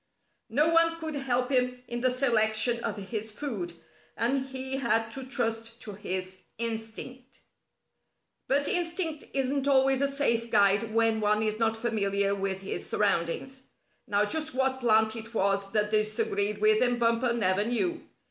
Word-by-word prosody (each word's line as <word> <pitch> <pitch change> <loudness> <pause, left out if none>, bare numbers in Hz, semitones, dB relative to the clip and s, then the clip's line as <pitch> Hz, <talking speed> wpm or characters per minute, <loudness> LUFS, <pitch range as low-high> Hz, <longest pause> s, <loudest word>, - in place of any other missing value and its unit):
No 290 +7 +3
one 330 0 +3
could 320 -1 -4
help 255 -2 -1
him 250 -1 0
in 240 0 -4
the 255 - +4
selection 235 -2 +2
of - - -3
his 215 +2 -4
food, 210 -8 -5 0.4
and 265 +4 0
he 265 0 -4
had 225 -3 0
to 265 +3 -6
trust 230 -2 -3
to 210 - -7
his 185 -1 -4 0.2
instinct. 230 +3 -6 1.1
But 285 +1 +2
instinct 335 -3 -1
isn't 275 +1 0
always 270 -1 +4
a 280 - +3
safe 235 -5 0
guide 205 +2 +3
when 225 0 +2
one 210 +1 +2
is 215 0 -1
not 225 -1 +1
familiar 200 -3 0
with 195 -1 -2
his 195 - -4
surroundings. 205 +7 -1 0.5
Now 205 -1 +2
just 310 +4 -1
what 265 0 +1
plant 220 -2 +3
it 225 0 -8
was 195 -1 +1
that 210 -1 +1
disagreed 210 -1 0
with 215 0 +4
him 245 -1 +2
Bumper 235 +1 +2
never 205 -4 +1
knew. 305 - -1
230 Hz, 155 wpm, -28 LUFS, 215-265 Hz, 1.1 s, the